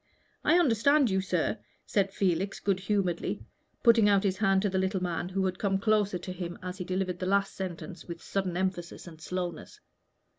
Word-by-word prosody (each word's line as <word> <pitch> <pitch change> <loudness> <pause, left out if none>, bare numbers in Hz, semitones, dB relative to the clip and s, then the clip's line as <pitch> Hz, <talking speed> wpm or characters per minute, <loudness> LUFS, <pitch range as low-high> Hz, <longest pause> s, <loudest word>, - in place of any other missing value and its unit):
"I 340 - +5
understand 280 - +4
you, 190 0 +2
sir," 185 +2 -1 0.3
said 195 -2 +1
Felix, 190 0 0
good 195 -2 0
humoredly, 190 -3 -1 0.4
putting 230 -3 +6
out 200 -1 +4
his 190 -2 +1
hand 195 -2 +3
to 205 - +2
the 190 0 0
little 190 +1 0
man, 175 0 -2
who 190 0 0
had 185 0 -2
come 195 -2 +1
close 210 0 +2
to 185 - -6
him 175 -1 -5
as 185 +1 -5
he - - -2
delivered 185 0 -2
the 185 - -2
last 200 +1 +2
sentence 185 -1 -6
with 170 -1 -6
sudden 185 -2 -2
emphasis 185 -2 -3
and 160 -3 -12
slowness. 175 -1 -5
190 Hz, 190 wpm, -29 LUFS, 180-200 Hz, 0.4 s, putting